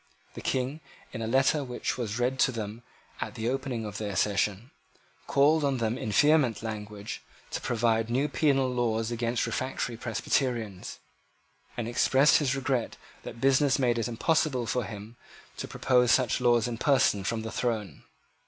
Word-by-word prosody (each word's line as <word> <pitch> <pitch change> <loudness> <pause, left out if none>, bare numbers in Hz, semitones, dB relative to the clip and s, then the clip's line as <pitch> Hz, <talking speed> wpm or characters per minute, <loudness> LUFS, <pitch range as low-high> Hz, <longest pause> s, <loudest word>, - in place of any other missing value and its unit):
The - - -8
King, 130 +4 -1 0.3
in 115 - -5
a 110 - -2
letter 135 +4 +2
which 125 -2 -3
was 115 -3 -3
read 125 +2 0
to - - +4
them 110 -1 -6 0.4
at - - -4
the 115 0 -3
opening 130 -3 -2
of 105 -1 -6
their 105 -2 -4
session, 105 +4 0 0.6
called 150 +3 +4
on 140 -2 +1
them 115 -1 -1
in 110 - -4
vehement 145 -1 +3
language 105 -2 -6 0.3
to - - -3
provide 115 -1 +1
new 130 +5 +1
penal 140 -2 +2
laws 115 -2 0
against 120 0 -1
the - - -4
refractory 130 -2 -3
Presbyterians, 115 -3 -2 0.8
and 120 -2 -2
expressed 135 +4 +4
his 135 -3 0
regret 135 -3 -1 0.2
that 115 - -9
business 135 +1 +3
made 120 -3 +1
it 115 - -1
impossible 130 +1 +1
for 125 0 -1
him 110 +2 -9 0.4
to - - -5
propose 125 -2 +2
such 130 -2 +2
laws 120 -1 +3
in 115 -2 -5
person 130 -8 +3
from 110 +2 -2
the 115 - -5
throne. 110 -5 -2
120 Hz, 165 wpm, -28 LUFS, 110-130 Hz, 0.8 s, to